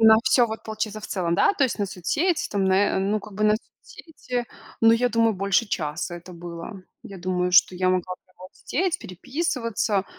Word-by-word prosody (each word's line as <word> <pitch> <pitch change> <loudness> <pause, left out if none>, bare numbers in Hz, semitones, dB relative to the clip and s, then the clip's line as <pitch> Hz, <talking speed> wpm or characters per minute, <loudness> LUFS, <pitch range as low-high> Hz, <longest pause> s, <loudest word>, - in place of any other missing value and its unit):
На 220 0 +8
всё 255 -2 +4
вот, 220 0 -6
получается, 215 -1 -4
в - - -7
целом, 175 -3 -1
да? 400 - +4
То 280 - +3
есть 240 - -2
на 200 - 0
соцсети 290 - -1
там, 200 -1 0
на, 190 - +3 0.2
э, - - +2
ну, 200 +3 +1
как 210 +1 -12
бы 210 - -3
на 210 0 +5
соцсети, 250 -1 -7 0.4
ну, 225 0 +6
я 245 +2 +3
думаю, 230 -1 +2
больше 195 +4 +1
часа 165 -1 -3
это 175 +1 -12
было. 175 +3 -8 0.2
Я 195 -2 -10
думаю, 180 0 -1
что 185 - +6
я 185 +1 +1
могла 185 0 0
прямо 185 - -33
вот 185 - -12
сидеть, 370 +4 -1
переписываться, 230 - -2
205 Hz, 205 wpm, -24 LUFS, 185-230 Hz, 0.4 s, На